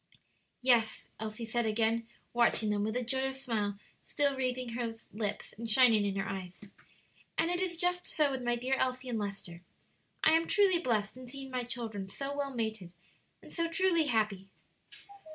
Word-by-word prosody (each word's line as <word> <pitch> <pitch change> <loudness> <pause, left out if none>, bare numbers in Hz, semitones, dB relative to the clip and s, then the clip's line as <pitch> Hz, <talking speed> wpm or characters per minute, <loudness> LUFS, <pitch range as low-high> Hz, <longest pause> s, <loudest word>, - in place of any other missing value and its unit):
"Yes," 235 -4 +3 0.2
Elsie 220 +1 -4
said 230 0 0
again, 225 +1 +1 0.3
watching 235 -2 +3
them, 205 0 +1
with 220 +2 -1
a 250 - 0
joyous 265 +2 -2
smile 210 -5 -1 0.3
still 285 -1 +1
wreathing 255 -1 -1
her 230 -1 -3 0.2
lips 210 -1 -3
and 230 0 -3
shining 220 -3 +6
in 195 - -2
her 195 0 -1
eyes; 185 -2 -6 0.8
"and 330 +2 +2
it 355 +1 0
is 355 -2 -1
just 355 +1 0
so 300 -3 +2
with 265 -1 -3
my 240 -1 +1
dear 250 +3 -1
Elsie 255 0 -1
and 230 -2 -1
Lester. 195 -4 -5 0.6
I 315 - +7
am 325 +1 +4
truly 390 -4 +4
blest 220 - 0
in 255 0 -10
seeing 270 +1 -8
my 250 -1 -2
children 225 -5 -4
so 275 +7 -4
well 285 -1 -2
mated 220 -7 -3 0.5
and - - -12
so 335 -1 0
truly 335 -1 +3
happy." 215 -5 0
240 Hz, 175 wpm, -32 LUFS, 215-270 Hz, 0.8 s, I